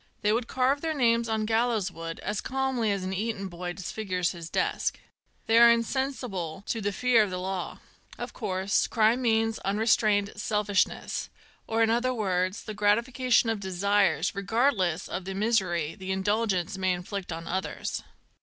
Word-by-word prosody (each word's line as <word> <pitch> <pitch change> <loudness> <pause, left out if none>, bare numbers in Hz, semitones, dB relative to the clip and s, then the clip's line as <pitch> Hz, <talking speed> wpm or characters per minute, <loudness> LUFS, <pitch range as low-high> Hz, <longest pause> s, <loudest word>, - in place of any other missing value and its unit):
They 210 +1 +3
would 230 +1 -1
carve 265 +2 +1
their 320 -1 -1
names 235 -3 +2
on 220 -1 0
gallows 225 -3 +1
wood 165 -1 -6
as 210 +1 -2
calmly 265 -4 0
as 200 -2 -2
an 185 +1 -3
Eton 200 0 -2
boy 175 0 -5
disfigures 185 -2 -2
his 170 -2 -8
desk. - - -1 0.5
They 225 +1 +5
are 235 0 +9
insensible 230 - -1
to 225 - -2
the 205 0 0
fear 245 +1 +3
of 210 - +1
the 180 - -4
law. 185 0 -4 0.4
Of - - -6
course, 190 +1 0
crime 230 +2 +3
means 225 -2 +1
— - - -16
unrestrained 205 0 +2
selfishness, 210 -2 0 0.4
or, 225 0 +2
in 225 - +3
other 250 +2 +1
words, 185 -3 -1
the 215 - -6
gratification 235 +3 +2
of 220 - -2
desires, 200 +1 +1
regardless 200 - +1
of 180 0 -5
the 190 0 -4
misery 190 -7 +1
the 190 -2 -9
indul 205 +4 +1
gence 190 0 -1
may 185 -1 +2
inflict 180 +1 -5
on 165 0 -5
others. 185 +3 -3
205 Hz, 170 wpm, -27 LUFS, 185-230 Hz, 0.5 s, are